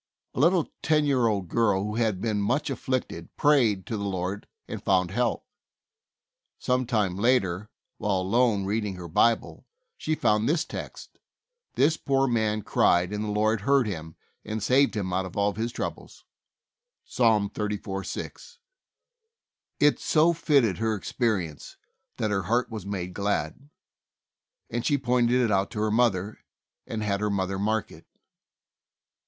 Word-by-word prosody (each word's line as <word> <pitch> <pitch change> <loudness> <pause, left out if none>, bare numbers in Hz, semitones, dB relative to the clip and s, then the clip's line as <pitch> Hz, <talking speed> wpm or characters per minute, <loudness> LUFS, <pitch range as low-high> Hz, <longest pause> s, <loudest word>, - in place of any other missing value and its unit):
A - - -5
little 170 +3 +3
ten 155 -1 +2
year 130 -5 +2
old 100 -4 -1
girl, 100 0 +1
who 105 +1 -3
had 110 -5 +1
been 105 -3 0
much 145 +9 0
afflicted, 130 -10 -3
prayed 120 -10 +3
to 110 - -3
the 100 - -4
Lord 95 +1 -3 0.2
and - - -6
found 95 -2 +2
help. 120 +3 -1 1.1
Some 125 -1 0
time 105 -7 0
later, 105 -4 +1 0.3
while 100 -3 0
alone 105 +1 +2
reading 105 -1 -2
her 90 -1 -8
Bible, 115 +8 +1 0.3
she 155 - -2
found 110 -3 +2
this 160 +1 +1
text: - - -9 0.6
"This 155 +4 +3
poor 135 -1 +1
man 110 -3 0
cried 90 +2 +2
and 105 0 -2
the - - -3
Lord 105 +1 +1
heard 135 +3 +3
him, 80 -6 -6 0.3
and 110 -1 -4
saved 135 +4 +3
him 95 -4 -2
out 95 +1 0
of 90 - -11
all 100 0 +2
his 115 +3 -3
troubles." - - -6 0.8
(Ps. - - -12 0.4
34: 100 -2 -3
6.) 480 - -7 1.2
It 145 0 +4
so 165 +2 +3
fitted 140 - +2
her 110 -1 0
experience 95 - -2 0.4
that 110 -1 -1
her 95 -1 +1
heart 120 +8 0
was 105 -4 -6
made 90 -3 -4
glad, 100 - -2 1.0
and 120 +1 -3
she 140 +3 +2
pointed 125 -1 +2
it 120 -3 +2
out 95 0 +1
to 110 - -6
her 105 0 +1
mother, 105 -3 +1 0.5
and 110 -1 -3
had 100 -2 0
her 105 0 0
mother 95 -1 -1
mark 110 +2 -1
it. - - -15
110 Hz, 155 wpm, -26 LUFS, 100-125 Hz, 1.2 s, It